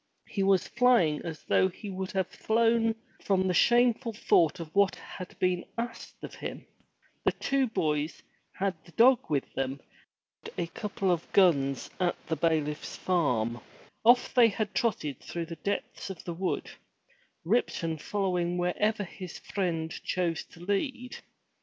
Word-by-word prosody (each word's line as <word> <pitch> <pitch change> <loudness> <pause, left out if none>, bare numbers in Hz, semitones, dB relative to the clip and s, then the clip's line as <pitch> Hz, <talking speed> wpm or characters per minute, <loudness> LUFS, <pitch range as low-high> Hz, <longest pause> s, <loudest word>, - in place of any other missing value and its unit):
He 200 - -3
was 195 -2 +3
flying 235 -11 +3
as 160 -3 -7
though 185 - +3
he 195 +2 -8
would 190 0 -4
have 190 -1 +1
flown 225 0 +2 0.3
from 190 -1 +2
the 180 - +1
shameful 240 +3 +3
thought 170 -7 +3
of 160 -2 -7
what 200 -1 +4
had 185 - -10
been 180 -1 +1
asked 240 +1 -6
of - - -7
him. - - -7 0.6
The - - +2
two 275 -1 +1
boys 155 -7 -1 0.3
had 195 0 -1
the 170 - -18
dog 250 +1 +6
with 140 -3 -1
them 135 0 -1
and 140 - -13 0.7
had - - -11
borrowed - - -5
a - - -25
couple 200 -3 -1
of 170 -1 -2
guns 140 -9 +3
at 180 -1 +1
the 160 - -1
bailiff's 155 -1 0
farm. 125 -10 0 0.4
Off 240 +2 +5
they 240 -3 +7
trotted 210 - -1
through 170 -1 -5
the 165 0 -7
depths 200 +2 -3
of 190 -4 -7
the 175 - -4
wood, 180 +2 -2 0.7
Ripton 165 -5 0
following 180 -1 -1
wherever 205 +5 +1
his 185 -1 -8
friend 165 -5 -2
chose 175 -3 -1
to 165 - -16
lead. 250 - -2
185 Hz, 155 wpm, -29 LUFS, 165-215 Hz, 0.7 s, they